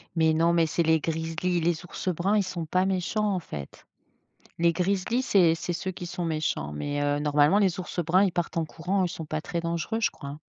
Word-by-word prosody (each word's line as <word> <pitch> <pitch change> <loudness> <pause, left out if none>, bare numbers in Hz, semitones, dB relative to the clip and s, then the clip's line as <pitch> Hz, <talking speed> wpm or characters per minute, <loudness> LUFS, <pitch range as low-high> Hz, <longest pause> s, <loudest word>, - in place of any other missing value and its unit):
Mais 160 -1 +3
non 165 +1 +3
mais 165 -1 +3
c'est 165 +2 0
les 160 0 +3
grizzlis, 165 +3 -1
les 170 +1 0
ours 180 - -4
bruns 190 +6 +1
ils 205 - +3
sont 180 -3 -4
pas 185 +4 +2
méchants, 195 +3 0
en 185 - 0
fait. 75 - -9 0.7
Les 170 0 +4
grizzlis 195 +7 0
c'est 180 -9 +4
c'est 170 +2 -3
ceux 185 +2 -3
qui 175 - -7
sont 175 +1 -4
méchants, 155 - -1
mais 145 - -3
heu, 145 0 +1
normalement 150 +5 +4
les 190 -3 +2
ours 180 - -6
bruns 180 +4 +4
ils 195 - +2
partent 175 0 -2
en 165 - +2
courant, 180 +5 -2
eux, - - +3
ils - - -2
sont 165 -2 -6
pas 155 +1 -3
très 170 - -3
dangereux 170 +6 -2
je 225 - +2
crois, 140 - -9
hein. 145 +2 -8
170 Hz, 240 wpm, -27 LUFS, 160-185 Hz, 0.7 s, Les